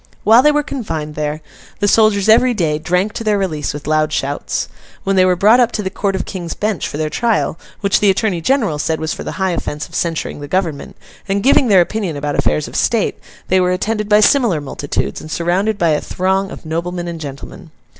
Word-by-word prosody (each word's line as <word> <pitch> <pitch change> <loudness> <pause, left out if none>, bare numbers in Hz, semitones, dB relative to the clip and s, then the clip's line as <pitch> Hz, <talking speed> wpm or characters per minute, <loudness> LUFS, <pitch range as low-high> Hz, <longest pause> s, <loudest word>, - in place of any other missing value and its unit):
While 225 +4 +6
they 300 +2 +5
were 295 0 +1
confined 160 - -5
there, 150 +1 -3 0.4
the 205 - +1
soldiers 215 -2 +3
every 240 +3 +5
day 155 -6 0
drank 180 +6 0
to - - -5
their 210 -2 +2
release 155 -7 -2
with 145 0 -8
loud 155 0 +1
shouts. 140 -1 -2 0.4
When 195 0 0
they 185 -1 +5
were 180 -1 +3
brought 215 +7 +5
up 240 -1 +3
to 210 - -2
the 190 - -3
Court 195 0 -1
of 190 - -3
King's 175 -4 -5
Bench 210 -3 -2
for - - -6
their 155 0 -1
trial, 230 -7 0 0.2
which 200 -1 +2
the 205 - +3
Attorney 190 -3 0
General 215 - +1
said 160 +1 -1
was 160 0 -2
for - - -7
the - - -5
high 190 -1 -1
offence 150 -3 -4
of - - -22
censuring 165 -3 -2
the 145 - -7
Government, 165 -4 -2 0.3
and 200 +1 0
giving 265 0 +4
their 195 -4 +6
opinion 180 -4 -2
about 145 0 -2
affairs 75 0 0
of - - -10
state, - - +1 0.3
they 185 - +3
were 180 - +2
attended 210 +3 -2
by 210 0 +5
similar 225 - +3
multitudes, 135 - -3
and 155 - -10
surrounded 185 +6 0
by 170 -3 +2
a 150 -1 +1
throng 190 +1 -1
of - - -10
noblemen 175 +2 -3
and 170 -1 -6
gentlemen. 140 -3 -9
185 Hz, 225 wpm, -17 LUFS, 155-210 Hz, 0.4 s, While